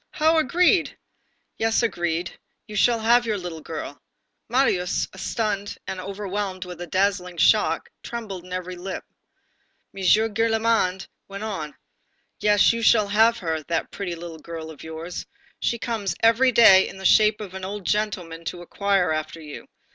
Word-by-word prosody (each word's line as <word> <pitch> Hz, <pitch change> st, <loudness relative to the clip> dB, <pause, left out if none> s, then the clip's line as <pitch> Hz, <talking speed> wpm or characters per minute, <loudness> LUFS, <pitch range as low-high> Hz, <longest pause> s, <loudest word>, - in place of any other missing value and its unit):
"How 320 Hz, +1 st, +3 dB
agreed?" 345 Hz, +4 st, +2 dB, 0.6 s
"Yes, 225 Hz, +1 st, +2 dB
agreed. 175 Hz, -5 st, -2 dB, 0.3 s
You 215 Hz, -, -9 dB
shall 230 Hz, +2 st, +3 dB
have 240 Hz, +2 st, +4 dB
your 215 Hz, -2 st, 0 dB
little 175 Hz, -4 st, -6 dB
girl." 145 Hz, -4 st, -7 dB, 0.5 s
Marius, 225 Hz, -8 st, +1 dB
stunned 205 Hz, -3 st, -2 dB
and 185 Hz, -, -5 dB
overwhelmed 195 Hz, -1 st, -4 dB
with 180 Hz, -1 st, -9 dB
the 175 Hz, -, -6 dB
dazzling 185 Hz, 0 st, 0 dB
shock, -, -, +3 dB
trembled 210 Hz, -7 st, -6 dB
in 180 Hz, -, -14 dB
every 185 Hz, 0 st, -4 dB
limb. 185 Hz, +1 st, -6 dB, 0.9 s
M. 195 Hz, -, -7 dB
Gillenormand 220 Hz, -1 st, +2 dB, 0.2 s
went 200 Hz, +1 st, -7 dB
on: 160 Hz, -9 st, -5 dB, 0.6 s
"Yes, 210 Hz, +1 st, +4 dB
you 230 Hz, -, -3 dB
shall 215 Hz, -2 st, +4 dB
have 225 Hz, +3 st, +4 dB
her, 160 Hz, -6 st, -2 dB
that 165 Hz, -1 st, -2 dB
pretty 180 Hz, -4 st, -4 dB
little 165 Hz, -1 st, -9 dB
girl 160 Hz, 0 st, -7 dB
of 155 Hz, -, -13 dB
yours. 160 Hz, +2 st, -7 dB, 0.3 s
She 235 Hz, -, 0 dB
comes 215 Hz, -7 st, -3 dB
every 230 Hz, +3 st, +5 dB
day 195 Hz, -5 st, +7 dB
in -, -, -11 dB
the 190 Hz, -, -9 dB
shape 215 Hz, +1 st, +5 dB
of 200 Hz, -4 st, -8 dB
an 190 Hz, 0 st, -7 dB
old 200 Hz, 0 st, -5 dB
gentleman 185 Hz, -6 st, -2 dB
to 175 Hz, -, -5 dB
inquire 195 Hz, -1 st, 0 dB
after 155 Hz, +1 st, -3 dB
you. 150 Hz, -2 st, -10 dB
195 Hz, 155 wpm, -24 LUFS, 175-220 Hz, 0.9 s, day